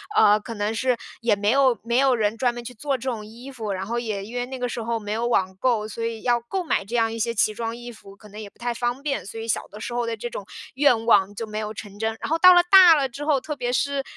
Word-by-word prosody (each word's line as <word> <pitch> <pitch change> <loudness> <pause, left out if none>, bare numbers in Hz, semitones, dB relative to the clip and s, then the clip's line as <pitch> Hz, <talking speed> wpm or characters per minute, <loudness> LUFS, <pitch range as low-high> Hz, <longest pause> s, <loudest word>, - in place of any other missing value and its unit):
呃， 210 - +5
可 210 +2 -8
能 205 +1 -2
是 255 +2 +1 0.3
也 230 -2 +2
没 205 +1 +1
有 265 -2 +3
没 235 +1 0
有 270 -2 +4
人 215 -1 0
专 245 +1 +1
门 240 0 -7
去 250 - -7
做 275 +4 -2
这 260 +2 -4
种 220 -3 -6
衣 235 +5 -11
服， 220 -5 -5
然 190 0 -4
后 235 +3 -2
也 215 -4 -4
因 230 +4 -10
为 245 0 -1
那 265 0 -6
个 250 -1 -2
时 235 - -4
候 230 0 -2
没 205 -1 -6
有 230 +2 -1
网 190 -5 0
购， 230 -3 +1
所 230 +1 -6
以 230 -1 -3
要 240 -1 +2
购 365 +11 -3
买 310 - 0
这 230 +5 -5
样 225 -1 +2
一 - - -5
些 235 +1 0
奇 215 -1 +2
装 230 0 -4
异 240 0 -9
服， 195 -3 -15
可 210 - -16
能 210 +1 -10
也 215 - -7
不 - - -33
太 240 0 -2
方 240 +2 -2
便， 280 -7 -3
所 225 +3 -8
以 225 - -6
小 225 - -1
的 210 +2 -12
时 240 - -5
候 240 -1 0
的 230 0 -3
这 240 +2 -6
种 205 - -7 0.3
愿 255 -5 +3
望 205 -3 +4
就 225 +2 -6
没 215 0 -6
有 215 0 -4
成 205 -2 -10
真。 220 +1 -2
然 - - -4
后 325 - +2
到 365 +2 +8
了 355 - +7
大 370 -3 +9
了 275 -3 0
之 280 +4 -7
后， 290 -4 +2
特 300 +2 -5
别 245 -2 -3
是 280 +1 0
235 Hz, 330 characters per minute, -23 LUFS, 215-255 Hz, 0.3 s, 大